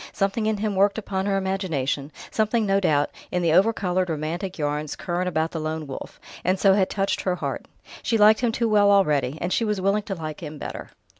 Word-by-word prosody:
Something 200 Hz, +2 st, 0 dB
in 220 Hz, -1 st, +1 dB
him 210 Hz, 0 st, -1 dB
worked 200 Hz, +2 st, +3 dB
upon 195 Hz, -2 st, -2 dB
her 195 Hz, -1 st, +1 dB
imagination, 165 Hz, -8 st, -2 dB, 0.2 s
something, 220 Hz, +1 st, +1 dB
no 195 Hz, 0 st, +2 dB
doubt, 145 Hz, -6 st, +2 dB, 0.2 s
in 180 Hz, -, -1 dB
the 165 Hz, -, +3 dB
overcoloured, 185 Hz, -1 st, +2 dB
romantic 165 Hz, +5 st, -3 dB
yarns 150 Hz, -1 st, -2 dB
current 180 Hz, +1 st, -2 dB
about 160 Hz, -1 st, -1 dB
the 165 Hz, -, -4 dB
Lone 155 Hz, 0 st, -3 dB
Wolf, 135 Hz, -2 st, -8 dB, 0.2 s
and 185 Hz, +1 st, +1 dB
so 195 Hz, -1 st, +5 dB
had 190 Hz, -1 st, +2 dB
touched 195 Hz, 0 st, -1 dB
her 185 Hz, -1 st, 0 dB
heart. -, -, -4 dB, 0.3 s
She 230 Hz, -, +1 dB
liked 215 Hz, +1 st, +6 dB
him 240 Hz, -2 st, +1 dB
too 235 Hz, +1 st, 0 dB
well 205 Hz, -2 st, +4 dB
already, 150 Hz, -9 st, +3 dB
and 175 Hz, +2 st, -1 dB
she -, -, +1 dB
was 210 Hz, -3 st, 0 dB
willing 195 Hz, +3 st, +1 dB
to 200 Hz, -2 st, -5 dB
like 155 Hz, -2 st, -6 dB
him 155 Hz, -2 st, -7 dB
better. -, -, -7 dB
190 Hz, 215 wpm, -24 LUFS, 160-205 Hz, 0.3 s, liked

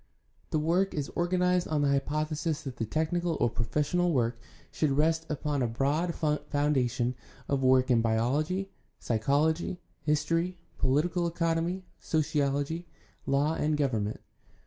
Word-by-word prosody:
The -, -, 0 dB
work 175 Hz, +6 st, +1 dB
is 145 Hz, -2 st, -2 dB
organized 180 Hz, 0 st, +2 dB
on 150 Hz, -2 st, +1 dB
the 140 Hz, -, +3 dB
hypothesis 155 Hz, +2 st, -1 dB
that 130 Hz, -4 st, -6 dB
the 115 Hz, -, -2 dB
technical 165 Hz, +4 st, 0 dB
or 120 Hz, -, +2 dB
pro 115 Hz, 0 st, -2 dB
fessional 175 Hz, +6 st, +1 dB
work 120 Hz, -4 st, +1 dB, 0.3 s
should 155 Hz, -, +1 dB
rest 160 Hz, +3 st, +1 dB
upon 150 Hz, -1 st, -1 dB
a 125 Hz, -, +2 dB
broad 145 Hz, +9 st, 0 dB, 0.3 s
foundation 130 Hz, -4 st, +1 dB, 0.3 s
of 140 Hz, -1 st, 0 dB
work 130 Hz, 0 st, +4 dB
in 115 Hz, -2 st, +5 dB
biology, 145 Hz, +12 st, 0 dB, 0.3 s
psychology, 150 Hz, +10 st, +1 dB, 0.2 s
history, 165 Hz, +4 st, 0 dB, 0.2 s
political 165 Hz, +6 st, +1 dB
economy, 170 Hz, +2 st, -1 dB
sociology, 150 Hz, +1 st, 0 dB, 0.4 s
law, 140 Hz, +3 st, +2 dB
and 155 Hz, -1 st, 0 dB
government. 110 Hz, -7 st, -1 dB
150 Hz, 130 wpm, -29 LUFS, 135-165 Hz, 0.4 s, in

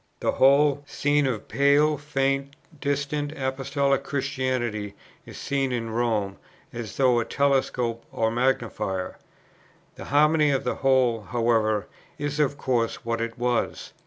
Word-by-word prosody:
The -, -, +1 dB
whole 140 Hz, +1 st, +4 dB
scene 145 Hz, -1 st, +1 dB
of 115 Hz, -6 st, -3 dB
pale, 140 Hz, +5 st, +3 dB
faint, 140 Hz, -1 st, -1 dB, 0.2 s
distant 145 Hz, +1 st, -2 dB
Apostolic 140 Hz, +1 st, 0 dB
Christianity 130 Hz, -7 st, -2 dB, 0.3 s
is -, -, -10 dB
seen 135 Hz, -2 st, -1 dB
in 115 Hz, -2 st, -3 dB
Rome, 110 Hz, -4 st, -1 dB, 0.4 s
as 115 Hz, -4 st, -6 dB
through 125 Hz, -3 st, +4 dB
a 115 Hz, -, -1 dB
telescope 130 Hz, -4 st, 0 dB
or 110 Hz, 0 st, 0 dB
magnifier. 115 Hz, -6 st, -1 dB, 0.8 s
The -, -, -8 dB
harmony 150 Hz, +1 st, +3 dB
of 135 Hz, -2 st, +1 dB
the -, -, -2 dB
whole, 130 Hz, -4 st, +2 dB
however, 110 Hz, -2 st, +1 dB, 0.3 s
is 145 Hz, +1 st, -3 dB
of 145 Hz, -1 st, +1 dB
course 120 Hz, -4 st, -1 dB
what 115 Hz, 0 st, -1 dB
it 115 Hz, 0 st, -4 dB
was. 120 Hz, 0 st, -1 dB
130 Hz, 130 wpm, -25 LUFS, 115-140 Hz, 0.8 s, whole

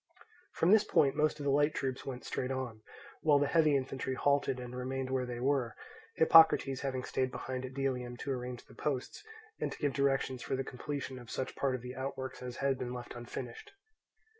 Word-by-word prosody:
From 170 Hz, -, +3 dB
this 215 Hz, 0 st, +7 dB
point 140 Hz, -3 st, +3 dB
most 150 Hz, 0 st, +1 dB
of -, -, -4 dB
the 140 Hz, -, +2 dB
light 145 Hz, +2 st, +3 dB
troops 130 Hz, -2 st, -2 dB
went 125 Hz, -2 st, -5 dB
straight 125 Hz, -, -2 dB
on, 130 Hz, -5 st, -4 dB, 0.4 s
while 150 Hz, -2 st, +5 dB
the 145 Hz, -, +3 dB
heavy 155 Hz, 0 st, +4 dB
infantry 130 Hz, 0 st, -3 dB
halted 140 Hz, -1 st, +2 dB
and 125 Hz, 0 st, -7 dB
remained 130 Hz, +1 st, -3 dB
where 130 Hz, -1 st, 0 dB
they 120 Hz, -1 st, -4 dB
were; 130 Hz, -3 st, +1 dB, 0.4 s
Hippocrates 160 Hz, -5 st, +6 dB
having 130 Hz, -2 st, -2 dB
stayed 130 Hz, 0 st, 0 dB
behind 130 Hz, 0 st, -4 dB
at 130 Hz, 0 st, -8 dB
Delium 125 Hz, -3 st, -2 dB
to 140 Hz, -, -4 dB
arrange 125 Hz, -1 st, -4 dB
the -, -, -17 dB
posts, 135 Hz, -4 st, -3 dB, 0.4 s
and -, -, -1 dB
to -, -, -7 dB
give 145 Hz, -3 st, 0 dB
directions 135 Hz, -2 st, +1 dB
for -, -, -2 dB
the 135 Hz, -, -1 dB
completion 135 Hz, 0 st, -5 dB
of 120 Hz, -2 st, -12 dB
such 130 Hz, -, -3 dB
part 135 Hz, -2 st, +1 dB
of 125 Hz, -, -7 dB
the 125 Hz, +1 st, -6 dB
outworks 130 Hz, 0 st, -5 dB
as 125 Hz, -1 st, -6 dB
had 135 Hz, -1 st, +1 dB
been 125 Hz, 0 st, -3 dB
left 120 Hz, -1 st, -7 dB
unfinished. 120 Hz, 0 st, -7 dB
130 Hz, 205 wpm, -33 LUFS, 125-140 Hz, 0.4 s, this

